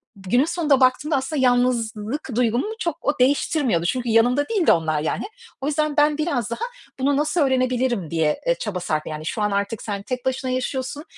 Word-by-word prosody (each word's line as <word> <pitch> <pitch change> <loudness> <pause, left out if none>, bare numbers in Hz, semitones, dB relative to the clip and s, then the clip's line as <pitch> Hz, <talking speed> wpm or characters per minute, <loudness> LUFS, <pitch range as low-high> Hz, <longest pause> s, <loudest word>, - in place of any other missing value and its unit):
günün 200 +8 +1
sonunda 310 -5 +2
baktığımda 270 +4 +2
aslında 270 +2 -1
yalnızlık 245 0 0
duygumu 240 - +1
çok 340 -3 -1
o 285 0 -1
değiştirmiyordu. 255 - +2
Çünkü 245 +4 -1
yanımda 245 - +3
değildi 410 -7 +3
onlar 155 -2 +1
yani. 155 - -2 0.4
O 270 - -2
yüzden, 305 0 0
ben 295 0 +4
biraz 285 -9 -1
daha, - - -3 0.4
bunu 275 +1 +2
nasıl 305 +3 +1
öğrenebilirim 255 - +1
diye, 160 -2 +1
e, - - +2
çaba 210 - -4
sarf 155 -3 -2
Yani 155 0 -6
şu 215 - -3
an 210 0 +1
artık 200 +2 -2
sen 200 -2 -4
tek 250 +1 -5
başına 260 0 -1
yaşıyorsun 260 +3 -3
255 Hz, 180 wpm, -22 LUFS, 210-290 Hz, 0.4 s, ben